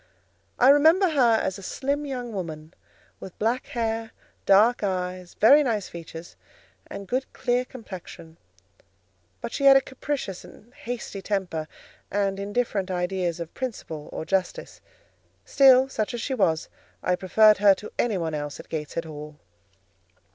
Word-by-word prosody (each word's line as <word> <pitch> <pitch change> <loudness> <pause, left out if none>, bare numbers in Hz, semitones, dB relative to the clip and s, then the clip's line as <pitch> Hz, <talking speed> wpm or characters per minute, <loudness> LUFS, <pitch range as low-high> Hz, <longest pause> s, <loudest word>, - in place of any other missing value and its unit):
I 255 - +6
remember 320 +7 +5
her 250 -7 +4
as 190 -3 -1
a - - -10
slim 280 +8 -3
young 245 -4 -5
woman, 160 -4 -6 0.5
with 190 - -10
black 230 +4 -1
hair, 225 -1 -3 0.3
dark 215 +5 +5
eyes, 180 -2 -3
very 280 +8 +6
nice 225 -8 -1
features, 165 0 -10 0.5
and 200 - -8
good, 260 +5 -2
clear 245 +1 0
complexion; 185 -9 -11 1.0
but - - -5
she 280 - -1
had 270 0 +9
a - - +6
capricious 265 -8 -5
and 235 +4 -16
hasty 235 -5 -6
temper, 185 -6 -2 0.4
and 195 -1 -1
indifferent 205 -1 -2
ideas 180 -1 -2
of 170 -1 -7
principle 185 - -6
or - - -5
justice: 190 0 -2 0.6
still, 265 -1 +6
such 240 -2 -3
as 235 - -4
she 270 - -2
was, 170 -9 +1 0.4
I 180 - +2
preferred 210 +3 +4
her 200 -1 +6
to 210 - -10
any 225 -5 +1
one 165 -3 -3
else 145 -1 -5
at - - -12
Gateshead 160 +1 -4
Hall. 150 -1 -9
205 Hz, 145 wpm, -25 LUFS, 180-245 Hz, 1.0 s, had